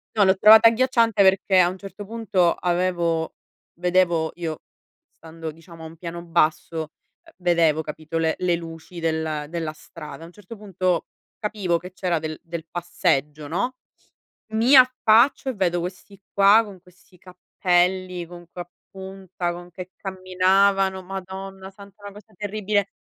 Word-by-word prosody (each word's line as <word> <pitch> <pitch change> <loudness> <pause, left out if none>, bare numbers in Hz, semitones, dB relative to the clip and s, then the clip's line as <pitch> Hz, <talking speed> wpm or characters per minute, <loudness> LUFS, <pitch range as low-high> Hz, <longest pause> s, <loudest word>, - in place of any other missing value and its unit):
No, 205 -2 +4
l'ho 190 0 +3
trovata 220 +3 +8
agghiacciante 230 -3 +2
perché 190 0 +3
a 175 -1 +5
un 185 - -7
certo 195 +1 -9
punto 195 -6 +1
avevo 175 -2 -1 0.5
vedevo 175 -3 +2
io 165 -3 -5 0.5
stando 165 0 -9
diciamo 165 +1 -15
a - - -7
un 160 - -13
piano 170 0 -7
basso, 160 -1 0 0.3
ehm, 330 - -19
vedevo 170 -3 +2
capito 155 +2 -5
le 160 -1 +1
le 180 -1 +1
luci 165 +1 -9
del 160 -2 -2
della 165 -2 -4
strada. 155 -2 -11
A - - -9
un - - -15
certo 210 +3 -12
punto 185 -4 -1 0.3
capivo 200 -6 -1
che 180 +2 -11
c'era 180 -4 -1
del 155 0 -6
del 165 -1 -7
passeggio, 155 -4 -1
no, 200 - -2 0.8
mi 230 +5 +4
affaccio 255 +1 +5
e 260 - -1
vedo 175 -3 0
questi 185 +2 -8
qua 200 +3 +6
con 200 -4 -11
questi 180 0 -23
cappelli, 180 0 -1
con 175 0 -12
que 180 - -8
a 175 - -7 0.2
punta, 190 -2 -6
con 175 +1 -8
che 185 +2 -9
camminavano. 190 +1 +1
Madonna 190 +1 -8
santa, 200 +1 -16
una 200 -1 -8
cosa 210 +1 -16
terribile. 205 0 -1
180 Hz, 155 wpm, -23 LUFS, 170-195 Hz, 0.8 s, trovata